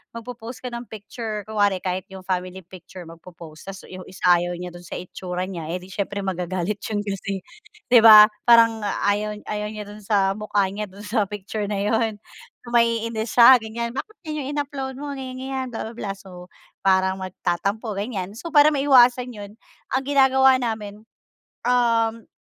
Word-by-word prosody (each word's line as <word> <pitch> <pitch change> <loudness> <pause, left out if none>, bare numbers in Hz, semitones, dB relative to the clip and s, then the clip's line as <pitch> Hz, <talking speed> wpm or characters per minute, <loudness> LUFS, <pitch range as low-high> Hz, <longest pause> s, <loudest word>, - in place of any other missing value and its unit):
magpo-post 235 +1 -8
ka 250 - -5
ng 235 0 -7
picture, 215 0 -6
kunwari 205 -3 +1
kahit 185 0 -3
'yung 190 -1 -11
family 185 0 -3
picture, 180 +1 -12
magpo-post, 165 0 -13
'tas 195 0 -8
'yung 185 0 -9
isa 185 - -13 0.2
ayaw 175 0 -3
niya 180 0 -7
do'n 175 0 -12
sa - - -6
itsura 180 0 -5
niya, 170 -5 -6
eh, 180 - -6
'di 190 - -13
siyempre 200 0 -3
magagalit 185 +1 -3
'yun 205 -2 -2
kasi 195 -1 -4 0.5
'di 240 - +9
ba, 215 -1 +9 0.2
parang 230 -1 +6 0.2
ayaw 210 +1 0
ayaw 210 0 -4
niya 215 -1 -6
do'n 210 +1 -10
sa 195 -2 +2
mukha 210 -1 0
niya 210 +1 -4
do'n 200 +2 -12
sa 210 -1 0
picture 205 +1 -5
na 210 - -2
'yun, 220 +1 0 0.6
maiinis 230 -1 0
siya 245 +1 +9
ganiyan. 230 +1 -5
"Bakit 435 +9 -6
ganiyan 305 -3 -4
'yung 285 - -4
in-upload 275 -2 -4
mo, 285 +1 -6
ganiyan 260 -2 -6
ganiyan, 265 0 -4
bla - - -3
bla - - -13
bla." 205 -4 -5
So 180 -2 -12 0.4
parang 190 0 +3
magtatampo, 190 +4 -3
ganiyan. 200 -3 -4
So 335 - -7
para 295 0 +7
maiwasan 255 -3 +4
'yun, 205 0 -10 0.4
ang 265 - 0
ginagawa 265 -1 +5
namin, 215 -3 -4 0.7
um, 230 -2 +1
210 Hz, 175 wpm, -23 LUFS, 190-235 Hz, 0.7 s, di